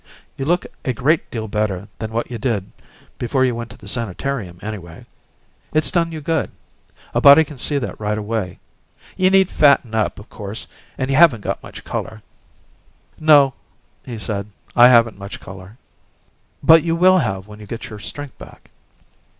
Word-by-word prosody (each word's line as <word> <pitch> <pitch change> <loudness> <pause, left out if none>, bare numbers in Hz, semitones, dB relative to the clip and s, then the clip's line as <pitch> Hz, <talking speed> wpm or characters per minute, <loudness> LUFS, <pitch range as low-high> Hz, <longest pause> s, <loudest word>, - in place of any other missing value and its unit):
"You 135 - -4
look 175 +4 +1 0.2
a 130 - -1
great 140 +7 +1
deal 110 -2 -4
better 100 -2 -2
than 110 0 -5
what 115 +2 -3
you 120 - -5
did 105 -6 -2 0.5
before 130 +2 +1
you 125 - +1
went 115 0 -6
to - - -13
the 105 - -14
sanitarium, 115 -2 -3
anyway. 95 -6 -8 0.7
It's 155 -2 +2
done 170 -2 +1
you 160 -1 -6
good; 160 0 -1 0.6
a - - +1
body 140 +3 +9
can 150 -3 -11
see 145 - 0
that 130 - -4
right 105 0 -1
away. 105 -3 -3 0.6
You 185 -1 +3
need 190 -1 +4
fatting 140 -6 +4
up, 110 -1 0
of 105 - -12
course, 105 +2 -7 0.3
and 130 +1 -2
you 135 - +2
haven't 155 -10 +6
got - - -3
much - - -11
color 110 -1 -5 0.5
" - - -37
"No," 145 -4 +6 0.5
he 120 -3 -7
said, 105 -2 -3 0.3
"I 120 0 +9
haven't 115 -4 +4
much 100 +1 -8
color." 95 +3 -12 0.9
"But 160 0 +7
you 165 0 0
will 185 +2 +5
have 95 - -2
when 105 0 -12
you 105 - -11
get 115 +1 -7
your 105 - -8
strength 145 +6 -7
back." - - -14
120 Hz, 180 wpm, -20 LUFS, 105-145 Hz, 0.9 s, body